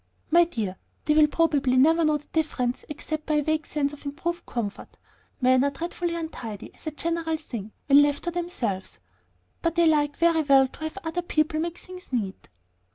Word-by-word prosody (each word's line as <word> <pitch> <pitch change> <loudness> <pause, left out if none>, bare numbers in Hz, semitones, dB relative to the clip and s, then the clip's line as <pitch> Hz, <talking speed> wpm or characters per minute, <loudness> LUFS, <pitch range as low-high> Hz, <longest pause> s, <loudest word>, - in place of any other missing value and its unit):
"My 345 +1 +7
dear, 215 - -4 0.3
they 300 - +3
will 305 0 +6
probably 290 -5 +2
never 325 +5 +5
know 305 -1 +3
the 295 - -17
difference 255 -6 -1
except 310 +1 -5
by 305 - +1
a 295 - +2
vague 315 +1 0
sense 290 -1 -1
of 295 - -11
improved 340 +5 -4
comfort. 215 -4 -5 0.4
Men 255 0 +4
are 280 - +3
dreadfully 340 +2 -3
untidy, 245 - -6
as - - -14
a - - -1
general 325 +1 -1
thing, 230 -9 -7
when 280 0 +7
left 290 0 +1
to 345 - -1
themselves; 260 - -3 0.6
but 335 0 0
they 340 0 +4
like 295 -2 +2
very 335 -1 +4
well 275 -2 +5
to - - -17
have 315 - -5
other 325 +2 -2
people 310 -2 0
make 335 +1 -3
things 365 0 -11
neat." 205 -7 -3
305 Hz, 190 wpm, -26 LUFS, 270-330 Hz, 0.6 s, My